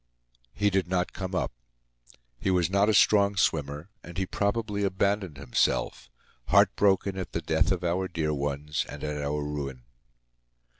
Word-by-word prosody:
He 105 Hz, 0 st, +2 dB
did 95 Hz, -1 st, +1 dB
not 90 Hz, -1 st, -1 dB
come 95 Hz, -1 st, -4 dB
up. 90 Hz, -, -1 dB, 0.9 s
He -, -, -1 dB
was 90 Hz, -1 st, +2 dB
not 100 Hz, +2 st, +3 dB
a -, -, +3 dB
strong 100 Hz, 0 st, +5 dB
swimmer, 75 Hz, +1 st, 0 dB
and 85 Hz, 0 st, -10 dB
he 95 Hz, -, 0 dB
probably 100 Hz, +1 st, -1 dB
abandoned 100 Hz, -3 st, 0 dB
himself, 70 Hz, -3 st, 0 dB, 0.4 s
heart 100 Hz, +5 st, +5 dB
broken 100 Hz, -1 st, +2 dB
at 95 Hz, -, -6 dB
the -, -, -1 dB
death -, -, +2 dB
of 90 Hz, -1 st, -1 dB
our 90 Hz, +2 st, 0 dB
dear 80 Hz, -3 st, -1 dB
ones 75 Hz, +1 st, -2 dB
and -, -, -8 dB
at 75 Hz, -1 st, -3 dB
our 75 Hz, +1 st, -2 dB
ruin. 70 Hz, -4 st, -5 dB
90 Hz, 160 wpm, -27 LUFS, 75-100 Hz, 0.9 s, strong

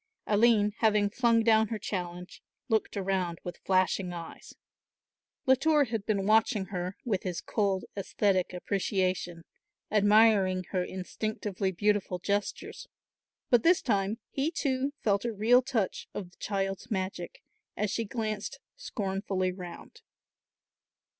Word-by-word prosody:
Aline 210 Hz, -1 st, +4 dB
having 210 Hz, -2 st, +3 dB
flung 230 Hz, -1 st, +3 dB
down 220 Hz, -1 st, +4 dB
her 220 Hz, -, -3 dB
challenge 180 Hz, -3 st, -5 dB, 0.3 s
looked 220 Hz, -2 st, 0 dB
around 185 Hz, -3 st, -1 dB
with 175 Hz, -, -7 dB
flashing 185 Hz, -1 st, +1 dB
eyes. 170 Hz, -1 st, -9 dB, 0.9 s
Latour 290 Hz, +3 st, +4 dB
had 225 Hz, -5 st, -4 dB
been 200 Hz, -3 st, +1 dB
watching 215 Hz, -2 st, +3 dB
her 180 Hz, +1 st, -3 dB
with 205 Hz, -6 st, 0 dB
his 180 Hz, -2 st, -3 dB
cold 200 Hz, -3 st, -1 dB
aesthetic 195 Hz, -1 st, 0 dB
appreciation, 185 Hz, -2 st, -1 dB, 0.5 s
admiring 205 Hz, -3 st, +4 dB
her 185 Hz, -2 st, +1 dB
instinctively 190 Hz, +1 st, -3 dB
beautiful 205 Hz, 0 st, 0 dB
gestures, 200 Hz, +3 st, -3 dB, 0.6 s
but 245 Hz, -2 st, +6 dB
this 345 Hz, +7 st, +4 dB
time, 200 Hz, -2 st, 0 dB
he 280 Hz, +3 st, 0 dB
too 275 Hz, -4 st, -1 dB
felt 200 Hz, -2 st, +2 dB
a 240 Hz, -, -1 dB
real 225 Hz, +4 st, +4 dB
touch 245 Hz, -7 st, -2 dB
of 180 Hz, -3 st, -5 dB
the -, -, -25 dB
child's 195 Hz, +2 st, -3 dB
magic 185 Hz, -4 st, -4 dB, 0.3 s
as 210 Hz, -1 st, 0 dB
she 230 Hz, -, -1 dB
glanced 215 Hz, +3 st, -4 dB, 0.2 s
scornfully 195 Hz, -2 st, -2 dB
round. 180 Hz, -2 st, -10 dB
205 Hz, 125 wpm, -29 LUFS, 185-220 Hz, 0.9 s, but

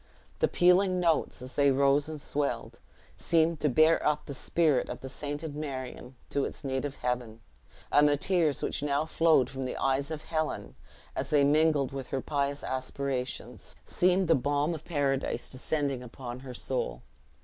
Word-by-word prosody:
The -, -, +4 dB
pealing 180 Hz, +1 st, +4 dB
notes, 165 Hz, -6 st, +1 dB
as 130 Hz, 0 st, -7 dB
they 140 Hz, -1 st, +4 dB
rose 140 Hz, +2 st, +3 dB
and 155 Hz, -1 st, -6 dB
swelled, 145 Hz, 0 st, -3 dB, 0.4 s
seemed 165 Hz, -1 st, +2 dB
to 150 Hz, -, +2 dB
bear 155 Hz, +5 st, +4 dB
up 150 Hz, 0 st, +1 dB
the 140 Hz, -, -6 dB
spirit 150 Hz, 0 st, +1 dB
of -, -, -6 dB
the 130 Hz, -, -6 dB
sainted 145 Hz, +2 st, -5 dB
Marion 130 Hz, -3 st, -6 dB, 0.2 s
to 140 Hz, -, +1 dB
its -, -, -5 dB
native 135 Hz, +1 st, -2 dB
heaven; 125 Hz, -3 st, -3 dB, 0.5 s
and 150 Hz, 0 st, +6 dB
the 145 Hz, -, +2 dB
tears 165 Hz, -3 st, +1 dB
which -, -, -1 dB
now 145 Hz, +1 st, +1 dB
flowed 160 Hz, -4 st, +3 dB
from 135 Hz, -, -7 dB
the 130 Hz, -, -3 dB
eyes 135 Hz, +2 st, 0 dB
of 155 Hz, -1 st, -5 dB
Helen, 155 Hz, -1 st, -3 dB, 0.4 s
as -, -, -2 dB
they 145 Hz, -2 st, +4 dB
mingled 150 Hz, -1 st, +3 dB
with 135 Hz, -2 st, -5 dB
her 135 Hz, -, -2 dB
pious 140 Hz, 0 st, -2 dB
aspirations, 130 Hz, 0 st, -4 dB
seemed 185 Hz, +1 st, +2 dB
the 165 Hz, -, +5 dB
balm 145 Hz, +3 st, +1 dB
of 160 Hz, -1 st, -8 dB
paradise 140 Hz, -4 st, -1 dB
descending 135 Hz, 0 st, -2 dB
upon 125 Hz, 0 st, -8 dB
her 130 Hz, -1 st, -9 dB
soul. -, -, -3 dB
145 Hz, 170 wpm, -29 LUFS, 130-155 Hz, 0.5 s, and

